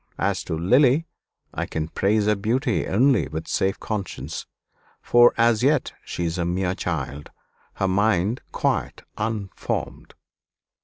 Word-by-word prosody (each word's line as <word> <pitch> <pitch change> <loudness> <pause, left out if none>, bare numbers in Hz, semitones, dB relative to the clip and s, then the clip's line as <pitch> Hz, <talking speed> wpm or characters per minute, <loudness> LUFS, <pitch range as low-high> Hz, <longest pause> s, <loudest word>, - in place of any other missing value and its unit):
As - - 0
to 80 - -3
Lily, 130 - +4 0.5
I - - -3
can 80 -1 -3
praise 105 +4 +1
her 105 - +4
beauty 115 +5 0
only 125 +4 +3
with 80 +1 -6
safe 95 0 0
conscience, 85 - -5 0.5
for 120 0 +5
as 115 -1 +3
yet 140 +1 +2
she 85 - -4
is 85 +1 -2
a - - +1
mere 90 +1 0
child 75 -5 -4 0.5
her 95 - 0
mind 100 +3 +1
quite - - -1 0.2
unformed." 105 -2 -4
100 Hz, 135 wpm, -24 LUFS, 85-120 Hz, 0.5 s, for